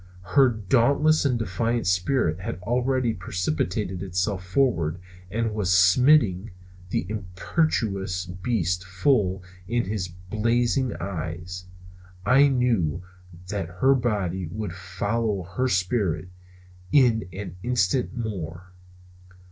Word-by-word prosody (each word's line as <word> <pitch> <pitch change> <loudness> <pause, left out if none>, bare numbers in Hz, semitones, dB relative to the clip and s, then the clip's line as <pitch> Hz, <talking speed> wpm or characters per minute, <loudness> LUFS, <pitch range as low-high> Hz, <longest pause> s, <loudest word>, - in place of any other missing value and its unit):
Her 135 -2 +6
dauntless 130 +8 +2
and 125 -3 +2
defiant 115 +3 -1
spirit 90 - +1
had 90 - -4
already 125 +1 +1
precipitated 90 -1 -2
itself 95 +1 -1
forward 90 - +1 0.3
and 115 +2 -1
was 105 -4 0
smiting 95 +2 +4 0.4
the - - -1
imperious 95 - -1
beast 90 -1 -1
full 95 0 +1 0.2
in 120 0 0
his 100 -2 -2
blazing 115 +8 0
eyes. 90 0 -5 0.6
I 135 +3 +6
knew 115 - +1 0.5
that 95 -4 -3
her 130 +10 +3
body 100 -8 -1
would 100 +1 -5
follow 100 +2 -2
her 95 +9 -2
spirit 95 -3 0 0.6
in 115 -8 +4
an 90 -1 -7
instant 120 +2 0
more. 90 -5 -5
100 Hz, 105 wpm, -25 LUFS, 90-120 Hz, 0.6 s, Her